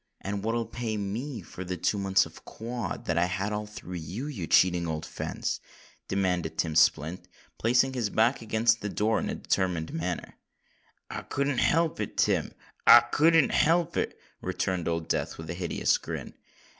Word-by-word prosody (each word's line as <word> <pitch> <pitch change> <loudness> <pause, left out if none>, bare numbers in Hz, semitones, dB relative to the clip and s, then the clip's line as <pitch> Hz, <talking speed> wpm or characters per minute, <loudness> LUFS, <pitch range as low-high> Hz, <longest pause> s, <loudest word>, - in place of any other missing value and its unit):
"And 100 0 -3
what'll 115 +1 0
pay 115 -1 -3
me 110 +4 -4
for 95 - -8
the 90 0 -4
two 100 +5 0
months 95 0 +3
of - - -13
quod 120 +1 -5
that 85 -1 +1
I 85 - +4
had 95 +3 -2
all 105 0 -3
through 90 -4 -7
you, 90 - -5
you 110 - -5
cheating 90 -2 +4
old 80 -1 -3
fence?" - - -3 0.5
demanded 90 -5 -1
Tim 80 -2 0
Splint, 80 +2 +2 0.3
placing 125 +3 +3
his 120 -5 -1
back 115 +5 +2
against 115 0 +2
the 105 - -3
door 110 +2 +1
in - - -3
a - - -2
determined 90 -4 -1
manner. 85 +1 -4 0.7
"I - - -4
couldn't 140 -2 -1
help 165 0 +2
it, - - -4
Tim—I - - +4
couldn't 160 -1 +5
help 170 +1 +3
it," - - -2 0.2
returned 90 -3 -2
Old 85 -1 -1
Death - - -1
with 80 0 -6
a - - -2
hideous 85 -1 +1
grin. - - -6
100 Hz, 170 wpm, -28 LUFS, 90-120 Hz, 0.7 s, couldn't